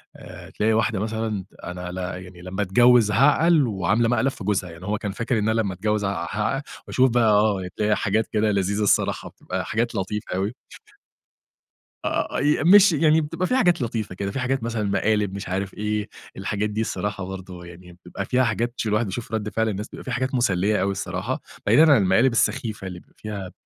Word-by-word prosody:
آآ، - - -11
تلاقي 110 +1 0
واحدة 110 -1 +1
مثلًا 110 -2 -3 0.2
أنا 90 0 -6
ل 90 - -7 0.3
يعني 90 -1 -13
لمّا 90 +3 -4
اتجوّز 115 +3 +5
هاعقل 150 +5 +4
وعاملة 105 +3 +1
مقلب 125 +3 +2
في 110 - -10
جوزها، 95 -2 -1
يعني 85 +2 -11
هو 105 +2 -1
كان 100 -1 -4
فاكر 115 +3 -1
إن 105 +1 0
أنا 110 0 +2
لمّا 100 -3 -2
أتجوّز 105 +3 -1
ع 100 -3 -2
هع 110 +6 -1 0.3
وأشوف 130 0 +3
بقى 120 0 +2
آه، 105 -3 +2
تلاقي 105 0 +2
حاجات 110 +2 0
كده 105 0 +1
لذيذة 100 +1 0
الصراحة 100 - +1
بتبقى - - -5
حاجات 115 +1 -1
لطيفة 100 0 -3
أوي. 100 +4 -1 1.5
آآ، - - -1
ي 145 +1 +2
ماشي 185 -2 +6
يعني 160 0 +4
بتبقى 160 +5 -2
في 255 - +1
حاجات 175 - +3
لطيفة 115 -5 -3
كده، 100 +1 -3
في 135 - -4
حاجات 130 0 -1
مثلًا 115 -2 -2
مقالب 105 0 +1
مش 100 -2 -6
عارف 95 +1 -2
إيه، 105 0 -2 0.3
الحاجات 100 +2 -2
دي 105 +1 -2
الصراحة 100 -3 -3
برضو 95 -1 -8
يعني 85 0 -13
بيبقى 100 +2 -5
فيها 130 +4 +2
حاجات 120 0 -1
ش - - -2
الواحد 105 +2 +1
يشوف 115 +5 -6
رد 110 -1 -2
فعل 110 +1 0
الناس، 105 0 -4
بيبقى - - -10
في - - -6
حاجات 130 +2 -1
مسلّية 105 -4 +1
أوي 100 - +1
الصراحة، 100 - -3 0.2
بعيدًا 160 0 +6
عن 145 - +7
المقالب 105 +6 +3
السخيفة 110 -3 -1
اللي 90 -1 -7
بيبقى - - -26
فيها 100 -4 -6
105 Hz, 200 wpm, -23 LUFS, 95-120 Hz, 1.5 s, عن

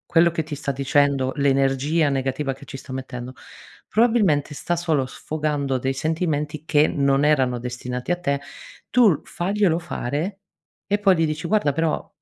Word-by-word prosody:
quello 170 +1 +6
che 160 -1 -2
ti 155 -1 -6
sta 140 -1 -3
dicendo, 140 -1 +1
l'energia 140 +3 +2
negativa 135 +1 -1
che 135 - -15
ci 135 - -8
sta 130 0 -9
mettendo, 130 -1 -6 0.6
probabilmente 210 - +2
sta 175 +4 -2
solo 160 -6 +1
sfogando 145 -3 -2
dei 130 +1 -1
sentimenti 155 0 -2
che 150 -1 +3
non 140 0 +2
erano 130 -5 +2
destinati 125 +4 -4
a 175 - 0
te; 140 -5 0 0.5
tu 245 -4 +6
l 155 - 0
faglielo 185 -2 0
fare, 170 +3 -3 0.5
e 205 +1 +1
poi 195 -2 +4
gli 165 - +3
dici: 155 +2 -3
"Guarda, 165 -9 +2
però, 160 +1 -1
145 Hz, 160 wpm, -23 LUFS, 135-165 Hz, 0.6 s, quello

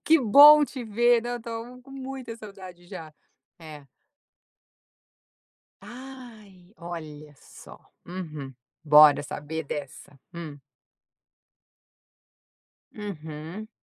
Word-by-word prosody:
"Que 325 +1 +5
bom 290 +6 +8
te 260 -4 -8
ver, 235 +2 +3
não 240 +1 -4
estou 235 +1 -8
com 270 - -18
muita 265 -3 -8
saudade 190 -5 -12
já.", 160 -3 -10 0.5
é. 150 -4 -12 1.9
Ai 235 -8 -13
olha 155 -3 -9
só, - - -15 0.3
uhum, 155 -7 -7 0.3
bora 150 -2 +7
saber 150 +2 -6
dessa, 140 -1 -8 0.2
hum. 155 -4 -8 2.4
Uhum. 165 0 -8
185 Hz, 85 wpm, -26 LUFS, 155-240 Hz, 2.4 s, bom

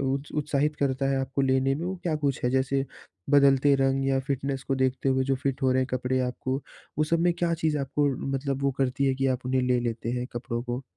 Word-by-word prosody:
उ 135 +1 +1 0.3
उत्साहित 150 +1 0
करता 135 -2 0
है 135 - +1
आपको 135 +1 -1
लेने 130 0 +2
में, 165 +4 -4
वो 190 +1 -3
क्या 165 -3 0
कुछ 140 -3 -1
है? 125 - +2
जैसे 135 +1 +1 0.5
बदलते 140 0 +5
रंग 135 0 +1
या 135 0 +2
फिटनेस 135 0 -3
को 135 - +2
देखते 130 0 0
हुए 130 0 +2
जो 135 0 +1
फिट 140 0 -2
हो 130 - +3
रहे 130 - +2
हैं 130 - -2
कपड़े 130 +1 0
आपको, 130 +1 -2 0.4
वो 155 - +3
सब 165 +2 +1
में 175 0 +3
क्या 170 -1 0
चीज़ 155 -1 0
है 145 - -1
आपको 145 +2 0 0.3
मतलब 135 0 -3
वो 140 - +3
करती 135 +1 +1
है, 135 - +2
कि 135 0 0
आप 130 -1 -1
उन्हें 130 0 +1
ले 125 -1 +2
लेते 115 -1 -3
हैं 125 0 -2
कपड़ों 120 0 -3
को? 125 +2 -4
135 Hz, 245 wpm, -27 LUFS, 130-140 Hz, 0.5 s, बदलते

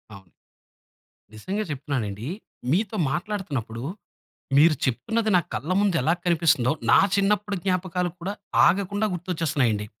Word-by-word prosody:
అవును. 95 -3 -16 1.0
నిజంగా 195 - -3
చెప్తున్నానండి, 130 -6 -3 0.4
మీతో 205 +5 0
మాట్లాడుతున్నప్పుడు, 145 - -3 0.8
మీరు 155 +1 +6
చెప్తున్నది 220 - 0
నా - - +6
కళ్ళ 160 +6 -3
ముందు 200 -4 +2
ఎలా 155 +6 +2
కనిపిస్తుందో, 160 -7 +3 0.2
నా - - +8 0.2
చిన్నప్పుడు 205 +1 +1
జ్ఞాపకాలు 180 -1 0
కూడా, 190 +4 -3 0.3
ఆగకుండా 200 +3 +1
గుర్తొచ్చేస్తున్నాయండి. 155 - -1
170 Hz, 110 wpm, -25 LUFS, 130-200 Hz, 1.0 s, నా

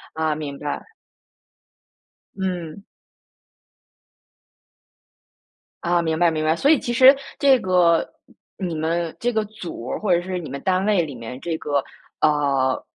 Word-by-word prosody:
啊， 160 -1 0
明 145 -2 -6
白。 150 - -5 1.5
嗯。 180 -2 -4 3.0
啊， 175 0 +2
明 160 -1 -1
白 175 -1 +5
明 155 -1 -2
白， 160 +1 +2
所 280 - +2
以 310 - +5
其 240 - -3
实 260 +3 +8 0.2
这 275 -2 +5
个 180 -4 +3 0.5
你 180 -4 -3
们 165 +1 -2
这 245 +1 0
个 220 -1 0
组 185 - -8
儿 - - -3
或 200 -4 +1
者 175 - +2
是 185 0 -4
你 160 - -7
们 140 - -6
单 190 +1 +1
位 200 -5 +3
里 145 -4 -7
面 120 +2 -8
这 165 0 -3
个， 145 -3 -1 0.4
呃， 140 -3 +1
170 Hz, 155 characters per minute, -22 LUFS, 155-190 Hz, 3.0 s, 实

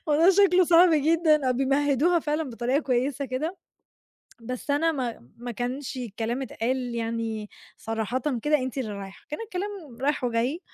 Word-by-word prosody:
الموضوع 315 +5 +5
شكله 370 -2 +5
صعب 345 +1 +6
جدًا، 305 -2 +3
آه، - - +3
بيمهدوها 280 +5 +2
فعلًا 300 0 -1
بطريقة 245 +4 0
كويسة 265 0 0
كده، 295 +9 -3 0.8
بس 250 +4 -5
أنا 325 +3 +2
ما 240 - -4
ما 240 +1 -6
كانش 250 +4 -4
الكلام 235 +2 -3
اتقال 250 0 -2
يعني 225 -2 -3 0.3
صراحةً 225 +3 -3 0.2
كده 300 0 +3
أنتِ 260 0 -4
اللي 220 -5 -3
رايحة، 195 -1 -9
كان 300 - -4
الكلام 370 - -6
رايح 285 -1 0
وجاي. 245 +8 0
265 Hz, 150 wpm, -26 LUFS, 240-305 Hz, 0.8 s, صعب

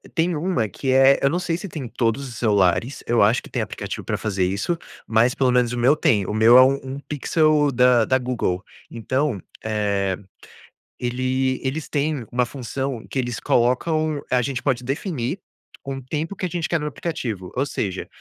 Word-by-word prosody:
Tem 170 0 +1
uma 150 - 0
que 130 +7 -3
é, 135 +1 +6
eu 135 - +3
não 175 +4 0
sei 170 -2 -1
se 200 - -7
tem 155 -5 -6
em - - -5
todos 120 +3 -1
os 120 - -9
celulares, 105 +3 +1
eu 120 -2 +3
acho 110 +4 +4
que - - -12
tem - - -2
aplicativo - - -5
pra - - -2
fazer 95 -4 -1
isso, 100 - -1 0.3
mas 115 +3 +3
pelo 130 -2 +2
menos 125 -1 +2
o - - -3
meu 130 +5 +4
tem. 105 -9 +2
O - - -3
meu 115 +3 +7
é 130 - +10
um 135 +1 +4
um 135 +1 -6
Pixel 150 0 +2
da 125 -2 +4
da 130 - +3
Google. 120 -8 -2 0.3
Então, 125 - -1 0.2
eh, 100 -3 0 0.8
ele 130 +1 0
eles 145 +4 -3
têm 145 -4 -1
uma 125 0 +2
função 130 -1 -4
que 135 - -2
eles 120 -2 -2
colocam, 150 +5 +1
a 125 -1 +3
gente 130 +1 -3
pode 125 -3 0
definir 140 - -3 0.5
um 135 -1 -4
tempo 155 +8 -4
que 185 - -3
a - - -2
gente 170 0 -2
quer 165 - +1
no 150 - -3
aplicativo, 120 - -4
ou 135 +3 +1
seja, 95 -8 -3
130 Hz, 200 wpm, -22 LUFS, 115-145 Hz, 0.8 s, é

